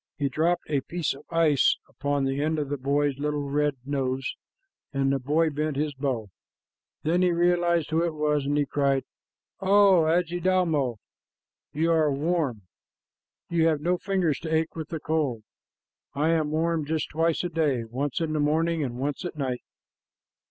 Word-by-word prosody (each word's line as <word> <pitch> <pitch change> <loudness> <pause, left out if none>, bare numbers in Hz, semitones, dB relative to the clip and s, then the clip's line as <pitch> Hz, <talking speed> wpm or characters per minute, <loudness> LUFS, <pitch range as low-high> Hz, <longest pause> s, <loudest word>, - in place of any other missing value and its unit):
He 140 -2 0
dropped 165 +6 +1
a 145 -3 0
piece 170 +3 -2
of 140 +2 -14
ice 165 -4 +3
upon 145 -1 -1
the 135 +1 -1
end 155 +1 0
of 145 -2 -2
the 145 - -2
boy's 140 +1 0
little 145 -1 -1
red 145 0 +1
nose, 135 -2 -2 0.6
and 135 -1 +1
the 135 - 0
boy 155 +5 +1
bent 150 0 -2
his 150 0 -1
bow. 130 -7 -3 0.7
Then 170 +4 +2
he 180 -1 +3
realized 170 -2 +2
who 165 +1 +2
it 170 -2 -1
was, 150 -2 0
and 145 +1 +1
he 145 - +2
cried, 140 -1 +1 0.6
"O 195 -3 +5
Adjidaumo, 170 -5 +1 0.8
you 165 +3 +1
are 155 -3 +3
warm. 145 - -1 0.8
You 165 -1 +2
have 155 -2 +2
no 175 +4 0
fingers 185 -7 0
to 160 - -5
ache 160 0 0
with 160 -2 -5
the 160 - -4
cold. 145 -8 -1 0.7
I 150 +3 +1
am 160 -2 +2
warm 160 +1 0
just 155 +1 -2
twice 165 +2 +1
a 175 - -1
day, 150 -7 0
once 130 +5 -3
in 160 -1 -1
the 155 - 0
morning 160 +2 +1
and 120 -3 -4
once 140 +6 -3
at 175 - -5
night." 130 -4 -2
150 Hz, 175 wpm, -26 LUFS, 140-165 Hz, 0.8 s, O